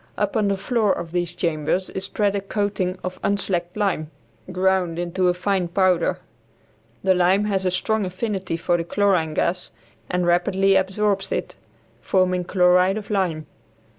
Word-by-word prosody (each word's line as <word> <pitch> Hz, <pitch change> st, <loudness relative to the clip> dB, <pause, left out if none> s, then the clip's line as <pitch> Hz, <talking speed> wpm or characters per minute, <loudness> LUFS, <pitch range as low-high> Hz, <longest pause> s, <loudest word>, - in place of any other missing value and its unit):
Upon 220 Hz, -8 st, 0 dB
the 200 Hz, -1 st, 0 dB
floor 215 Hz, +1 st, +1 dB
of 170 Hz, -3 st, -3 dB
these 175 Hz, 0 st, -2 dB
chambers 170 Hz, +1 st, -1 dB
is 190 Hz, -, -3 dB
spread 205 Hz, -2 st, 0 dB
a 200 Hz, -, -1 dB
coating 195 Hz, -2 st, -2 dB
of 185 Hz, 0 st, -5 dB
unslacked 185 Hz, -2 st, -1 dB
lime 190 Hz, -7 st, -1 dB, 0.4 s
ground 185 Hz, -2 st, +1 dB
into 175 Hz, +1 st, 0 dB
a 180 Hz, -, +3 dB
fine 190 Hz, -1 st, 0 dB
powder. 180 Hz, 0 st, +2 dB, 0.9 s
The 190 Hz, -1 st, +4 dB
lime 185 Hz, +3 st, +3 dB
has 195 Hz, -2 st, 0 dB
a -, -, +3 dB
strong 215 Hz, +4 st, 0 dB
affinity 190 Hz, -2 st, -3 dB
for 175 Hz, +1 st, +1 dB
the 165 Hz, -, -2 dB
chlorine 175 Hz, -4 st, +1 dB
gas 180 Hz, +1 st, -1 dB, 0.4 s
and 180 Hz, 0 st, 0 dB
rapidly 190 Hz, +3 st, +2 dB
absorbs 195 Hz, +1 st, 0 dB
it, -, -, -3 dB, 0.5 s
forming 185 Hz, +1 st, +1 dB
chloride 180 Hz, +1 st, +3 dB
of 215 Hz, 0 st, -7 dB
lime. 175 Hz, -6 st, 0 dB
185 Hz, 155 wpm, -22 LUFS, 175-200 Hz, 0.9 s, The